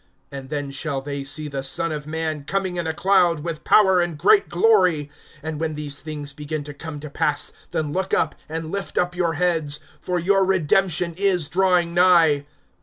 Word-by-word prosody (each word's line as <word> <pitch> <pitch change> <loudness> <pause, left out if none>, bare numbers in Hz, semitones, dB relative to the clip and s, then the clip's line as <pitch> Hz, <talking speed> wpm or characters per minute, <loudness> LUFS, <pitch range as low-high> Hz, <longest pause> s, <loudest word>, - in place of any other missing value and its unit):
(27)And 135 -1 -8
then 145 -2 -3
shall 140 0 -3
they 140 0 -5
see 145 +2 -2
the 140 -2 -4
Son 135 +5 -1
of 150 -1 -5
man 155 -2 -3
coming 185 +3 -2
in 170 -2 -2
a - - 0
cloud, 175 -3 +3
with 165 -1 -5
power 190 -4 +5
and 175 -3 -2
great 410 - +4
glory. 180 -7 +3 0.3
(28)And 155 -1 -4
when 160 -1 -2
these 145 -1 -5
things 150 -2 -6
begin 150 +1 -5
to 145 0 -8
come 150 +1 -7
to 150 - -7
pass, 145 0 -1 0.2
then 150 -2 -2
look 190 +1 -2
up, 160 - +1 0.2
and 160 0 -5
lift 200 0 -4
up 180 0 +1
your 175 -2 0
heads; 160 -3 0 0.2
for 180 -1 -2
your 195 +3 +3
redemption 180 -1 +1
is 185 -5 +1
drawing 180 -1 +2
nigh. 170 -5 +4
160 Hz, 190 wpm, -22 LUFS, 150-180 Hz, 0.3 s, power